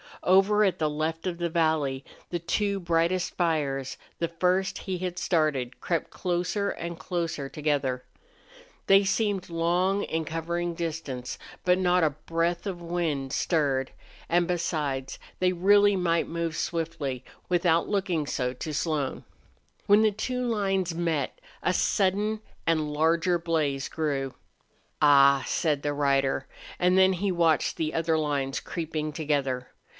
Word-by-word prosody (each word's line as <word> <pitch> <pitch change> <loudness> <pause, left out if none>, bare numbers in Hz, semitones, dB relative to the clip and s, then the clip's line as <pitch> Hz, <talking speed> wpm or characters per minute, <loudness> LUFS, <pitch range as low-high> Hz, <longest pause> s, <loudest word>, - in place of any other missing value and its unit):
Over 195 +3 +5
at 195 -3 +2
the 155 -1 +1
left 155 +3 -2
of 180 -2 -2
the 170 0 0
valley 155 -5 +1 0.3
the 175 - -1
two 200 +4 0
brightest 170 +1 0
fires, 145 -6 0 0.2
the 170 - +1
first 180 +3 0
he 185 -2 -4
had 180 -1 -3
started, 140 -9 0
crept 170 +3 -1
closer 180 +3 -1
and 170 0 -5
closer 165 -7 -3
together. 140 -4 -1 0.8
They 195 +1 +6
seemed 200 -2 0
long 175 +4 +1
in 160 0 -2
covering 170 +2 -2
distance. 155 -7 -4 0.2
But 180 0 +4
not 180 -1 +3
a 155 - +3
breath 165 +5 -2
of 180 -3 -4
wind 165 -6 -2
stirred, 140 -6 +1 0.4
and 175 0 +2
besides 150 -6 -2 0.2
they 185 0 +2
really 205 +3 +5
might 170 -3 +1
move 165 -1 -3
swiftly, 145 -7 -3 0.3
without 175 -2 +2
looking 185 -7 0
so 125 -3 -1
to 150 +4 -5
Slone. 145 -2 -1 0.6
When 205 +1 +6
the 215 -1 +4
two 250 +4 -2
lines 195 -6 0
met 165 - -1 0.2
a - - +2
sudden 205 +2 +1 0.2
and 155 -2 +1
larger 165 +3 +2
blaze 155 -5 -1
rose. 140 -4 -1 0.7
"Ah!" 140 -2 +6
said 150 -4 0
the 145 0 -1
rider, 140 -2 +1 0.3
and 180 +1 +3
then 190 0 +6
he 190 +2 -1
watched 165 -3 +2
the 155 -1 -1
other 165 0 +1
lines 140 -3 -1
creeping 155 -2 -4
together. 140 -5 -1
165 Hz, 140 wpm, -27 LUFS, 150-180 Hz, 0.8 s, They